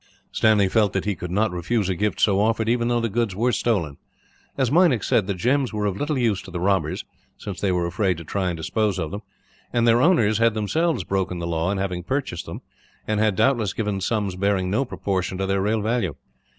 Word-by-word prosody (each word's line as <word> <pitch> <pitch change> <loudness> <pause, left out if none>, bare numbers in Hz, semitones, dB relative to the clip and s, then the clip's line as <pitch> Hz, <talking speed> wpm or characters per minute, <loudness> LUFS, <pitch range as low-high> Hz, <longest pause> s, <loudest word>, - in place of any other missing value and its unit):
Stanley 105 -3 +3
felt 105 0 +2
that 95 - -1
he 105 - 0
could 90 0 -7
not 105 +4 +1
refuse 90 +4 -1
a 95 - 0
gift 105 +4 -1
so 100 -2 +3
offered, 110 +1 +1
even 120 0 +1
though 120 0 +1
the 115 - 0
goods 115 -2 -1
were 120 +5 +1
stolen. 90 -14 0 0.6
As 130 -3 +1
Meinik 160 - +4
said, - - +2
the 100 - -1
gems 130 +7 +1
were 105 -1 -1
of 100 -3 0
little 145 +6 -2
use 115 -6 +1
to 95 - -12
the 90 -1 -5
robbers, 95 +1 0 0.3
since 100 -3 -7
they 100 - +1
were 90 -1 0
afraid 90 0 0
to 85 - -8
try 95 +3 -2
and 85 - -3
dispose 105 +4 -1
of 80 -4 -3
them; 100 - -5 0.5
and 120 -1 +2
their 115 +1 +5
owners 115 - +3
had 115 -1 +3
themselves 155 - 0
broken 95 -1 -2
the 85 - -4
law 85 +1 -1
in 100 - -1
having 95 -2 -2
purchased 125 -4 -3
them, - - -7 0.5
and 110 -1 0
had 110 -2 +2
doubtless 115 -4 +2
given 105 -3 -2
sums 100 -2 -1
bearing 95 -1 0
no 135 +7 +1
proportion 95 -5 -2
to 95 - -1
their 95 0 0
real 105 +2 +1
value. 105 - -1
105 Hz, 230 wpm, -23 LUFS, 95-115 Hz, 0.6 s, their